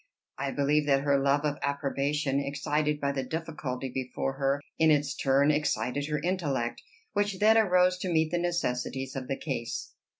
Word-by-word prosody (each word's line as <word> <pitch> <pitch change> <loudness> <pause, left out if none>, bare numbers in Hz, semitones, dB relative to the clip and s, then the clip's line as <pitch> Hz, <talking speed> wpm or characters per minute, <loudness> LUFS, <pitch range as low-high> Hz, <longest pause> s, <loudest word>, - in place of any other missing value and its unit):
I 140 0 -1
believe 145 +2 +1
that 135 -1 +3
her 140 -1 +3
love 140 +2 +2
of 145 -1 -1
approbation, 140 0 0
excited 145 +2 -1
by 140 -1 0
the 140 -1 -2
difficulty 140 -3 -4
before 130 +1 -2
her, 135 +1 0 0.2
in 160 0 +5
its 145 -1 +2
turn 140 +2 +3
excited 145 -2 0
her 150 -1 -1
intellect, 145 -8 -1 0.3
which 205 -1 0
then 215 +3 +5
arose 180 -4 +4
to 185 -1 -2
meet 160 -1 +2
the 175 - +1
necessities 135 -6 -2
of 130 -1 -4
the 135 - -2
case. 130 -6 -4
145 Hz, 170 wpm, -29 LUFS, 135-160 Hz, 0.3 s, in